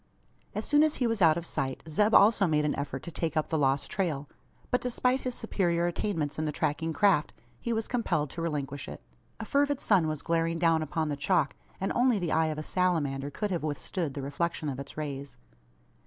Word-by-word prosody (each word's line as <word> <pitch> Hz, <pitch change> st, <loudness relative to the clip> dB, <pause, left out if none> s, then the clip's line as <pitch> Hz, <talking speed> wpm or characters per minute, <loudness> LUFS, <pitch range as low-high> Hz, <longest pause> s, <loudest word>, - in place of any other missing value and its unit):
As -, -, -2 dB
soon 295 Hz, 0 st, +4 dB
as 310 Hz, -1 st, +3 dB
he 250 Hz, -, 0 dB
was 225 Hz, -3 st, 0 dB
out 165 Hz, -2 st, +6 dB
of 170 Hz, -, -4 dB
sight, 135 Hz, -5 st, -2 dB
Zeb 210 Hz, +8 st, +3 dB
also 205 Hz, -2 st, +6 dB
made 150 Hz, -2 st, +2 dB
an 150 Hz, -, +1 dB
effort 140 Hz, 0 st, -4 dB
to 170 Hz, -, -7 dB
take 160 Hz, -1 st, -2 dB
up 155 Hz, -, 0 dB
the 160 Hz, -, +1 dB
lost 135 Hz, 0 st, +1 dB
trail. 155 Hz, -7 st, -1 dB, 0.4 s
But 250 Hz, -, +2 dB
despite 250 Hz, +1 st, +1 dB
his 250 Hz, -1 st, -3 dB
superior 175 Hz, -6 st, 0 dB
attainments 165 Hz, -4 st, -2 dB
in 155 Hz, -, 0 dB
the 150 Hz, -, -1 dB
tracking 150 Hz, +2 st, -1 dB
craft, 185 Hz, -3 st, +3 dB, 0.3 s
he 235 Hz, -, -3 dB
was 225 Hz, -1 st, -1 dB
compelled 165 Hz, -, 0 dB
to 170 Hz, -, -5 dB
relinquish 145 Hz, -4 st, -3 dB
it. -, -, -9 dB, 0.4 s
A 225 Hz, -, -4 dB
fervid 285 Hz, +3 st, +1 dB
sun 185 Hz, -7 st, +3 dB
was 155 Hz, -2 st, -3 dB
glaring 165 Hz, 0 st, +1 dB
down 165 Hz, -1 st, +3 dB
upon 155 Hz, +1 st, -1 dB
the 145 Hz, -, -1 dB
chalk; 150 Hz, 0 st, +1 dB, 0.2 s
and 195 Hz, -, -1 dB
only 245 Hz, -2 st, +3 dB
the 175 Hz, -4 st, -2 dB
eye 160 Hz, 0 st, +3 dB
of 155 Hz, -1 st, -3 dB
a 155 Hz, -, -4 dB
salamander 150 Hz, -7 st, 0 dB
could 205 Hz, +7 st, -3 dB
have 175 Hz, -, -1 dB
withstood 155 Hz, +1 st, -3 dB
the 140 Hz, -, -4 dB
reflection 150 Hz, +2 st, -2 dB
of 135 Hz, -1 st, -4 dB
its 140 Hz, +2 st, -9 dB
rays. 140 Hz, -2 st, -5 dB
165 Hz, 215 wpm, -29 LUFS, 150-200 Hz, 0.4 s, out